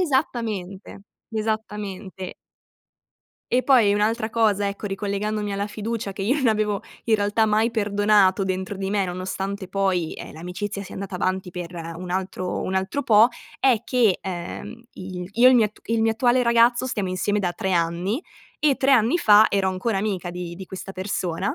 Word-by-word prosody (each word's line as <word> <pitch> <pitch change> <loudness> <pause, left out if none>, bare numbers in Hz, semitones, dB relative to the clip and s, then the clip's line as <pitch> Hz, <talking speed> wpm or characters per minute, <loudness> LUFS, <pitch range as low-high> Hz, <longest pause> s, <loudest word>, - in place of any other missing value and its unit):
Esattamente, 230 - -2 0.3
esattamente. 210 -4 -4 1.2
E 255 +1 +3
poi 235 -7 +5
un'altra 220 +2 +1
cosa, 210 -3 +2
ecco, 200 +1 -5
ricollegandomi 205 +1 -2
alla 200 +1 -2
fiducia 215 -1 -4
che 195 - -8
io 210 +7 +2
non 265 -5 +2
avevo 210 -2 0 0.2
in 225 - +3
realtà 210 +1 +2
mai 215 +2 +2
perdonato 205 -3 +3
dentro 190 +1 -3
di 195 0 -3
me, 200 -2 +1
nonostante 190 +1 -4
poi, 190 -4 0
ehm, - - -9
l'amicizia 180 +5 -5
sia 195 - -10
andata 195 0 -6
avanti 185 0 -1
per 175 0 -7 0.2
un 180 +1 -7
altro 185 0 -2
un 190 - -3
altro 190 +9 -1
po', 220 -1 +6 0.3
è 250 -5 +3
che, 235 -7 +2
ehm, 185 +6 -6
i 185 -1 -7
il 180 - -9
io 240 +4 +6
e - - +7
il - - +5
mio 230 - +5
at 210 0 -6
il 225 0 +1
mio 225 0 +3
attuale 245 +2 +3
ragazzo 235 +1 +4
stiamo 205 -6 -2
insieme 185 +3 0
da 180 -3 -1
3 190 +2 -2
anni, 175 - 0 0.4
e 295 -3 +3
3 275 - +2
anni 240 +4 +4
fa 215 -9 +6
ero 195 -1 +1
ancora 195 +3 -1
amica 195 -3 -2
di 175 -1 -6
di 190 +2 -9
questa 190 +1 -8
persona, 185 -1 -2
205 Hz, 180 wpm, -23 LUFS, 190-225 Hz, 1.2 s, e